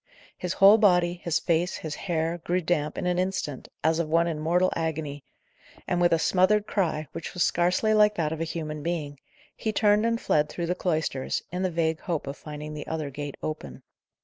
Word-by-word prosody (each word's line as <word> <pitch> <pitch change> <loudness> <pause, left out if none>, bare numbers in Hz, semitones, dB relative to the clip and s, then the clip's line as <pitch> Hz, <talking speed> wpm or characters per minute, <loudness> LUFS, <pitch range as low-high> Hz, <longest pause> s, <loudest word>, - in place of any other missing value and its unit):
His 180 0 -3
whole 200 +3 +7
body, 180 -4 +3
his 170 -2 +1
face, 170 +1 0
his 155 -2 -5
hair, 165 -1 -2
grew 175 +2 0
damp 155 -3 -1
in - - -3
an 180 0 +1
instant, 180 -7 -2 0.2
as 160 +1 +2
of 165 -2 -1
one 165 +1 +3
in 165 -3 -2
mortal 175 +4 +2
agony, 155 -3 -3 0.6
and 175 - 0
with 175 - +4
a 165 - +5
smothered 190 +5 +3
cry, 160 -8 -1
which 165 - -7
was 180 - +2
scarcely 180 +5 +2
like 210 0 +5
that 155 -4 -1
of 160 0 -4
a - - +2
human 155 -2 -4
being, 150 -4 -3 0.4
he 220 - -2
turned 210 0 +3
and 230 0 0
fled 150 -7 +1
through 170 - -3
the 175 - 0
cloisters, 160 -7 -1
in 180 +1 -3
the 185 - +1
vague 160 -2 0
hope 170 -5 -3
of 140 0 -5
finding 150 0 -8
the 150 -1 -7
other 155 -3 -3
gate 145 +1 -6
open. 110 - -6
165 Hz, 205 wpm, -26 LUFS, 155-180 Hz, 0.6 s, whole